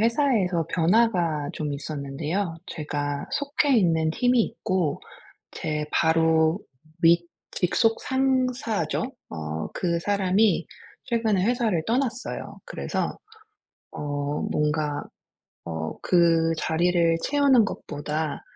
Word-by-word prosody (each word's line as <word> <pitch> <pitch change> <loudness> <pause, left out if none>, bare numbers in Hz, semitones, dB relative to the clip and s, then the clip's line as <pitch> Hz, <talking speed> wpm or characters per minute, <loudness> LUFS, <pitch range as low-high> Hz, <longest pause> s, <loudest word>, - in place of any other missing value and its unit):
회사에서 225 - +2
변화가 170 -5 +2
좀 150 -2 -3
있었는데요. 150 +5 -3
제가 145 -2 -3
속해 285 -2 +1
있는 160 -5 +3
팀이 245 +7 +3
있고 185 -7 -1 0.5
제 150 0 -3
바로 160 +1 +3 0.4
윗 170 +1 +5 0.2
직속 225 +5 +1
상사죠. 255 - 0 0.3
어 80 0 -4
그 170 -2 0
사람이 200 +2 +2 0.4
최근에 225 -7 +1
회사를 225 -8 +1
떠났어요. 250 0 -2
그래서 - - -3 0.7
어 145 0 -3
뭔가 150 -1 0 0.6
어 80 -1 -4
그 165 -2 +3
자리를 170 +1 +2
채우는 280 -5 +4
것보다 150 -4 -4
170 Hz, 205 characters per minute, -25 LUFS, 150-225 Hz, 0.7 s, 윗